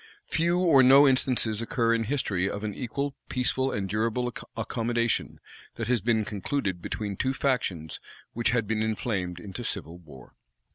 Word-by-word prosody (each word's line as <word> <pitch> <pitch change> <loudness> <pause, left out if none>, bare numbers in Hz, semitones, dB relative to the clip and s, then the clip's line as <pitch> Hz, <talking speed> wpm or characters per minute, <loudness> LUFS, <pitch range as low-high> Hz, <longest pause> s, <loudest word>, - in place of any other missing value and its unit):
Few 170 +2 +1
or 165 -7 +5
no 135 +3 +8
instances 125 -4 +1
occur 115 -1 +1
in 115 -1 0
history 100 -7 0
of 100 +1 -5
an 105 -1 -2
equal, 140 +6 -3 0.2
peaceful, 130 +1 +1
and 100 -2 -2
durable 115 +4 -1 0.2
accommodation 115 +1 -1 0.4
that 115 -2 -4
has 125 -4 +2
been 110 -1 +1
concluded 105 -2 -2
between 105 +1 -4
two 130 +6 -1
factions 100 - -1 0.3
which 120 0 +1
had 120 -2 +1
been 110 -1 0
inflamed 105 -5 -2
into 100 +6 -7
civil 85 -6 -5
war. 70 -7 -15
115 Hz, 155 wpm, -27 LUFS, 100-130 Hz, 0.4 s, no